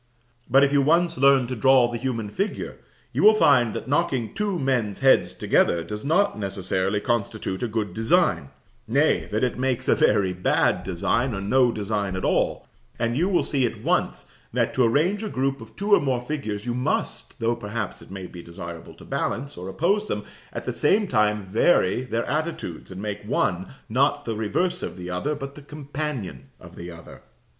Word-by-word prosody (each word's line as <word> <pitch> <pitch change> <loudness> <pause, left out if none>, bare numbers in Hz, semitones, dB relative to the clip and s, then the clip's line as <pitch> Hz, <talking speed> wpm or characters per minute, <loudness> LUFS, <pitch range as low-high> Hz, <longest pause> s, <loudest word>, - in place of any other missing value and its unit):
But 135 +3 +6
if 140 0 +2
you 140 - +5
once 170 +4 +3
learn 135 -1 +5
to 130 +1 -4
draw 130 +1 +5
the 120 -1 -4
human 115 -5 -3
figure, 200 - -3 0.3
you - - 0
will 215 +1 +7
find 125 - +4
that - - -5
knocking 135 -5 0
two 200 -2 -1
men's 125 - 0
heads 135 0 +4
together 85 -1 +2
does 105 +4 -6
not 180 - +2
necessarily 95 0 -1
constitute 105 -4 -2
a 120 - 0
good 105 -4 -3
design; 110 - +2 0.4
nay, - - +2
that 110 +3 0
it 125 -1 -1
makes 130 -2 -1
a - - +5
very 95 -2 +2
bad 90 0 +1
design, 110 +7 0
or 95 - -4
no 125 +5 +3
design 100 -3 -2
at 95 - -3
all; - - 0 0.3
and 120 0 -1
you 175 +7 +1
will 185 - +2
see 135 -3 0
at 120 - -2
once - - 0 0.3
that 115 -1 0
to 130 - +3
arrange 155 - +2
a 215 - -3
group 135 -2 -1
of 115 - -12
two 205 +2 0
or - - +8
more 130 -3 0
figures, 120 -6 -4
you 120 - -1
must, 125 -3 -2
though 115 0 +1
perhaps 110 -2 -5
it - - -14
may 95 -1 -7
be 90 -1 -10
desirable 85 0 -9
to - - -14
balance, 140 +4 -3
or 90 +2 -7
oppose 200 - +1
them, 105 - -3 0.3
at - - -6
the - - -1
same 205 +7 +2
time 105 - +1
vary 95 - +2
their 115 -2 -2
attitudes, 155 - -3
and 95 +1 -7
make 105 -1 -4
one, 95 -3 0 0.2
not 140 +5 +1
the 115 - -2
reverse 175 - -1
of - - -5
the 90 0 -6
other, 140 +12 -1
but 140 -1 -7
the 150 - -12
companion 140 - -6
of - - -14
the 85 +1 -8
other. 85 -1 -12
120 Hz, 195 wpm, -24 LUFS, 105-140 Hz, 0.4 s, or